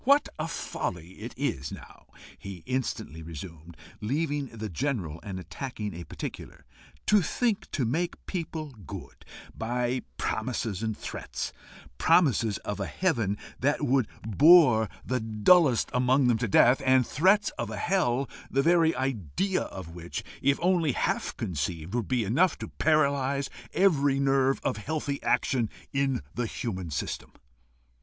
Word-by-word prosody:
"What 280 +3 +4
a 155 - -1
folly 90 - -4 0.3
is 70 - -2
it - - -4
now," - - -15 0.3
he 95 -4 -9
instantly 125 - -3
resumed, 80 +1 -9 0.2
leaving 145 +4 -1
the 110 -3 -6
general 90 - -2
and 95 -2 -6
attacking 105 +1 -5
a 85 +1 -7
particular, - - -8 0.4
"to 210 -1 +5
think 220 +4 0
to 135 - -1
make 170 +9 -2
people 160 -4 -4 0.2
good - - -9 0.3
by 120 +2 -1 0.2
promises 110 -3 -2
and 110 -2 -2
threats - - -5 0.5
promises 135 - +4
of 105 - -3
a 100 - -2
heaven 115 - 0 0.2
that 145 +3 +1
would 130 -3 +2 0.2
bore 125 - +6 0.2
the 130 0 0
dullest 115 - +4
among 125 +2 +3
them 120 -2 +3
to 120 - 0
death, 125 +7 +5
and 130 -1 +4
threats 195 - +3
of 115 - -2
a 110 - -5
hell 135 - +1 0.2
the 135 +1 +2
very 165 0 +4
idea 135 - -1
of 95 -4 -7
which, 85 0 -6 0.2
if 140 +1 +3
only 175 -6 +3
half - - -1
conceived, 80 +2 -3
would 120 -2 -1
be 125 -3 +1
enough 155 - +2
to - - -7
paralyse 140 -3 +1 0.2
every 145 -8 +3
nerve 135 -1 +3
of - - 0
healthy 145 +4 -3
action 120 -5 +1 0.2
in 135 -2 +1
the 120 -1 -1
human 95 -8 -4
system!" 70 - -4
130 Hz, 145 wpm, -28 LUFS, 105-150 Hz, 0.5 s, bore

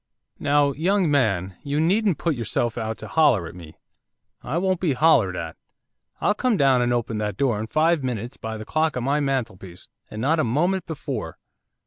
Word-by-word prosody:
'Now, 145 0 +3
young 175 +3 +1
man, 95 -10 +1
you 145 +1 -2
needn't 190 +3 +2
put 170 - 0
yourself 115 -1 -2
out 110 -1 -3
to - - -9
holler 135 - +3
at - - -8
me, 85 -3 -12 0.6
I 145 +7 -3
won't 185 0 0
be 170 -6 +1
hollered 125 - +3
at! 80 -2 -6 0.6
I'll 205 - +2
come 235 0 0
down 135 -4 +4
and 120 0 +1
open 115 -2 -1
that 105 -2 -3
door 120 -6 +1
in 110 - -4
five 155 +2 +2
minutes 120 0 -4
by 110 0 -6
the 110 - -8
clock 155 +2 0
on 125 - -2
my 140 +3 +1
mantelpiece, 115 -11 -4 0.2
and 110 - -7
not 155 +7 +1
a - - +3
moment 175 +10 0
before. 135 - -5
135 Hz, 190 wpm, -23 LUFS, 110-160 Hz, 0.6 s, down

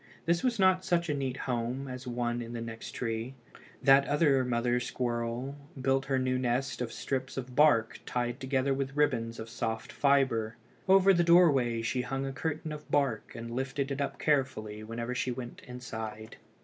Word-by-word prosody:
This 170 +1 +2
was 245 -3 +1
not 185 -1 +4
such 170 -2 +1
a - - +2
neat 135 -2 -2
home 125 +2 -2
as 125 0 -7
one 120 0 -1
in 120 0 -7
the 120 - -4
next 115 0 -7
tree. 115 +2 -3 0.5
That 140 0 +6
other 145 -3 +3
mother 120 0 +1
squirrel 120 +2 -2 0.2
built 135 +1 +1
her 135 -1 +1
new 130 0 +1
nest 125 +1 -1
of 120 -2 -2
strips 130 -1 -3
of 125 -1 -5
bark 125 -7 +4
tied 120 +1 -2
together 135 0 +1
with 135 0 -3
ribbons 115 -6 +1
of 110 - -6
soft 115 +2 -3
fibre. 130 -7 +2 0.3
Over 195 0 +7
the 175 -1 +3
doorway 140 -10 +4
she 125 +2 0
hung 135 +2 -3
a 135 - -4
curtain 155 +2 -3
of 150 0 -8
bark, 135 -7 0
and 115 0 -6
lifted 135 +2 -2
it 140 +1 -2
up 140 - -2
carefully 120 -8 0
whenever 115 +2 -4
she 125 - -1
went 120 -1 -6
inside. 110 -3 -7
130 Hz, 180 wpm, -30 LUFS, 120-140 Hz, 0.5 s, Over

